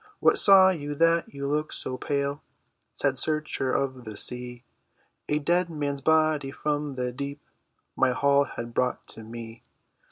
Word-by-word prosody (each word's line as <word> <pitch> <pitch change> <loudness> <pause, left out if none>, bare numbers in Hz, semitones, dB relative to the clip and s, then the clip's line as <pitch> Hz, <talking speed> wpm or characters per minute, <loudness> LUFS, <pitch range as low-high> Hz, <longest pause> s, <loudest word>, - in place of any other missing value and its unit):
"What - - +4
saw 190 -1 +8
you 145 -4 -5
that 165 +2 +2
you 140 0 -6
look 150 +2 -1
so 130 - -4
pale, 140 +2 -2 0.5
Sad 135 -2 -1
searcher 155 -4 0
of 130 -2 -2
the 110 -2 -8
sea?" 125 0 -3 0.7
"A 150 - +2
dead 175 +4 +1
man's 145 -3 -3
body 155 -2 +2
from 145 0 -3
the 125 -1 -3
deep 140 +3 -6 0.6
My - - +3
haul 140 +2 +2
had 115 -3 -8
brought 125 +1 -1
to - - -8
me!" 115 0 -9
140 Hz, 155 wpm, -26 LUFS, 125-150 Hz, 0.7 s, saw